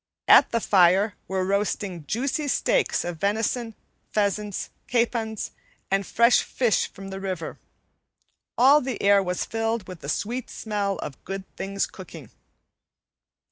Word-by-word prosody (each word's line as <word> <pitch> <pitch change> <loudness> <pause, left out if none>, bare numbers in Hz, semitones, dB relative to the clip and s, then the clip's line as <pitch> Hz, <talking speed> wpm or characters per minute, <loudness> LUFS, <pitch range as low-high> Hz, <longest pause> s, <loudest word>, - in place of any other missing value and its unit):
At - - +8
the 230 - 0
fire 190 0 +4
were 190 -1 -1
roasting 195 -4 -1
juicy 280 - -1
steaks - - +1
of 175 -1 -4
venison, 225 +3 -1 0.4
pheasants, 205 -1 -1 0.2
capons, 230 -3 -1 0.4
and 195 0 +1
fresh 235 +1 +4
fish 240 -5 +1
from 195 0 -10
the 190 0 -6
river. 185 -4 -5 1.0
All 275 +5 +6
the 255 -3 -4
air 200 0 +5
was 180 -1 -2
filled 225 -2 -2
with 185 -3 -9
the 140 - -7
sweet 240 +9 -2
smell 205 -3 -2
of 135 - -8
good 195 0 -5
things 195 0 -2
cooking. - - -11
205 Hz, 135 wpm, -25 LUFS, 190-230 Hz, 1.0 s, At